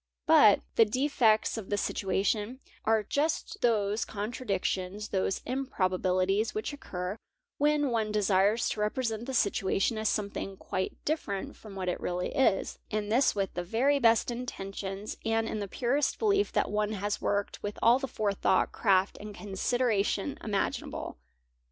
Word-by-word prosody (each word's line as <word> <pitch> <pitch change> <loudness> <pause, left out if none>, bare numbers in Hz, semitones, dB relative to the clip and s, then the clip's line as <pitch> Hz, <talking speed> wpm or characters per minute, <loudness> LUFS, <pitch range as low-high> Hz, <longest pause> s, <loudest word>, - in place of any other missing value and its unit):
But - - +6 0.2
the - - +8
"defects 225 -2 +2
of 200 - -9
the 205 - 0
situation" 205 +5 -1 0.3
are 220 -1 +3
just 295 +9 -1
those 215 -2 +2
contra 215 +4 -5
_ - - -15
dictions, 195 +2 -1
those 190 0 -1
vmprobabilities, 195 - 0
which 430 -8 -3
occur 185 -7 -5 0.4
when 295 -2 +2
one 220 -2 0
desires 205 +1 +2
to - - -4
represent 225 +1 -1
the 265 - -3
situation 200 0 +1
as 220 - +1
something 200 -2 -3
quite 185 0 -3
different 295 -11 -2
from 210 -3 -12
what 185 -1 -4
it 180 - -1
really 180 0 -2
vs, 255 -8 +2
and 210 0 -2
this 255 +2 +3
with 195 -2 -1
the 175 - -3
very 255 +10 +2
best 230 -1 +4
intentions 195 -4 -5
and 225 0 +1
in 215 - -3
the 200 - -3
purest 260 +7 0
belief 405 -2 +2
that - - 0
one 210 +1 0
has 205 0 -2
worked 205 0 -1
with 205 0 -4
all 240 +3 +6
the 270 - -3
forethought, 200 -5 +1
craft, 195 -2 +2
and 210 -1 -8
consideration 210 +3 0
imaginable. 200 - -3
210 Hz, 155 wpm, -29 LUFS, 195-240 Hz, 0.4 s, the